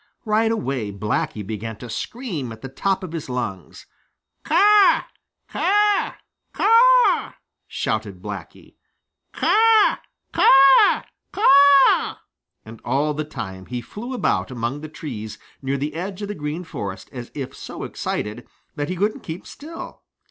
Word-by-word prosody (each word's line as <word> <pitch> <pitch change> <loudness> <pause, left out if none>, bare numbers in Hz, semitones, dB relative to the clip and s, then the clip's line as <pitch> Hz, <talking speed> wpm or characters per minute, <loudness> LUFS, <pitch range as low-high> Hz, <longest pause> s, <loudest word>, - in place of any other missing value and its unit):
Right 220 +1 +2
away 135 - -2
Blacky 105 +1 -3
began 110 +1 -6
to 125 - -9
scream 170 - -5
at 110 0 -11
the 135 - -6
top 190 +8 -1
of 180 - -6
his 165 -5 -6
lungs. 115 -8 -5 0.6
"Caw, 400 +5 +5 0.4
caw, 415 0 +2 0.4
caw!" - - +4 0.3
shouted - - -3
Blacky. - - -9 0.5
"Caw, 445 0 +4 0.4
caw, 270 +8 +6 0.3
caw!" 280 -7 +5 0.5
And 110 0 -12
all 140 +5 0
the 155 +1 -3
time 95 -10 -8
he 125 0 -4
flew 230 - -7
about 95 - 0
among 125 +3 -4
the 155 - -8
trees 120 -9 -7 0.2
near 135 +1 -2
the 145 +2 -3
edge 190 +4 -5
of 205 - -5
the - - -2
Green 150 +1 -5
Forest 100 - -7
as 120 -2 -8
if 135 -2 -6
so - - -8
excited 105 +3 -4 0.3
that 145 0 -3
he 185 - -2
couldn't 205 +4 -1
keep 160 +2 -7
still. 320 +3 -10
155 Hz, 135 wpm, -22 LUFS, -, 0.6 s, caw